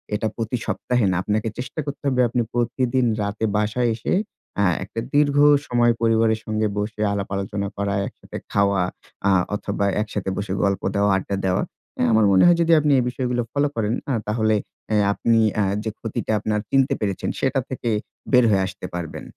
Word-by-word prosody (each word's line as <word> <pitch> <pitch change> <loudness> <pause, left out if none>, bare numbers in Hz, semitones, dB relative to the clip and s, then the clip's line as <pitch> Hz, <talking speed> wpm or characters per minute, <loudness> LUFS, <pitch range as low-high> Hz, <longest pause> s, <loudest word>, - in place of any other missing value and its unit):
এটা 110 +1 -1
প্রতি 115 +2 -2
সপ্তাহে 110 +3 0
না। - - 0
আপনাকে 110 +1 -1
চেষ্টা 130 +5 -6
করতে 145 +1 -6
হবে 130 -2 +2
আপনি 120 +1 0
প্রতিদিন 125 +1 +1 0.2
রাতে 105 +2 -2
বাসায় 110 +3 +1
এসে 110 - -2 0.5
আ - - +4 0.2
একটা 100 +4 -6 0.2
দীর্ঘ 145 -1 +3 0.3
সময় 120 -1 +3
পরিবারের 115 -1 +3
সঙ্গে 110 0 0
বসে 105 +1 -3
আলাপ 100 -1 -3
আলোচনা 100 +1 -3
করা, 100 0 -1
একসাথে - - -10
খাওয়া 100 -1 +2 0.5
আ - - +4 0.2
অথবা 100 -1 -2 0.2
একসাথে 105 -2 -3
বসে 100 -1 -3
গল্প 100 -1 +1
দেওয়া, 100 0 +3
আড্ডা 100 +1 -3
দেওয়া। 90 -1 +1 0.4
আ - - +1
আমার 110 -1 +4
মনে 95 - +5
হয় 175 -1 +6
যদি 165 0 +2
আপনি 150 -1 +2
এই - - +1
বিষয়গুলো 125 -1 -1
ফলো 145 +1 +1
করেন 110 -1 0 0.3
তাহলে 110 0 +2 0.3
অ্যা 110 - +2 0.2
আপনি 115 +2 +2 0.4
যে 110 - -2
ক্ষতিটা 115 -1 -3
আপনার 105 0 -1
চিনতে 135 -1 +3
পেরেছেন 100 -3 -2
সেটা 135 0 +1
থেকে 125 -2 -3 0.4
বের 125 -1 +6
হয়ে 95 -2 +3
আসতে 95 0 -8
পারবেন। 85 -2 -5
110 Hz, 175 wpm, -22 LUFS, 100-125 Hz, 0.5 s, হয়